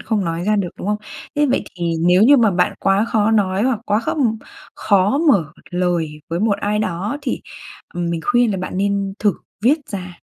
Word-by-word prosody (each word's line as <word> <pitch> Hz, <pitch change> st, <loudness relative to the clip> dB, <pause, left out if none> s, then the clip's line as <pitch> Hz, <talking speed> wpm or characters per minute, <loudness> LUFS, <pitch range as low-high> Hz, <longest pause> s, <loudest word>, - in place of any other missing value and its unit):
không 215 Hz, -4 st, -1 dB
nói 165 Hz, +1 st, -3 dB
ra 210 Hz, +1 st, +2 dB
được, 190 Hz, -3 st, 0 dB
đúng -, -, -6 dB
không? 210 Hz, -, +1 dB, 0.4 s
Thế 295 Hz, -, +3 dB
vậy 260 Hz, -, 0 dB
thì 170 Hz, -1 st, -1 dB
nếu 180 Hz, +2 st, +5 dB
như 275 Hz, +5 st, +7 dB
mà 225 Hz, -4 st, +4 dB
bạn 180 Hz, -1 st, +1 dB
quá 195 Hz, +2 st, +2 dB
khó 220 Hz, -2 st, +1 dB
nói 200 Hz, -2 st, +1 dB
hoặc 245 Hz, -4 st, +1 dB
quá 210 Hz, +1 st, +2 dB
khó 230 Hz, -, -2 dB, 0.6 s
khó 200 Hz, +6 st, +2 dB
mở 170 Hz, -, +3 dB, 0.2 s
lời 175 Hz, -4 st, -1 dB
với 170 Hz, +1 st, -2 dB
một 205 Hz, -2 st, +1 dB
ai 210 Hz, +1 st, 0 dB
đó 205 Hz, +6 st, -2 dB
thì 265 Hz, -, -2 dB, 0.5 s
mình 170 Hz, -1 st, -2 dB
khuyên 245 Hz, -2 st, +3 dB
là 195 Hz, -, -1 dB
bạn 185 Hz, 0 st, -5 dB
nên 200 Hz, 0 st, 0 dB
thử 205 Hz, -4 st, +2 dB, 0.3 s
viết 280 Hz, +7 st, +4 dB
ra. 180 Hz, -3 st, -6 dB
200 Hz, 205 wpm, -19 LUFS, 180-220 Hz, 0.6 s, như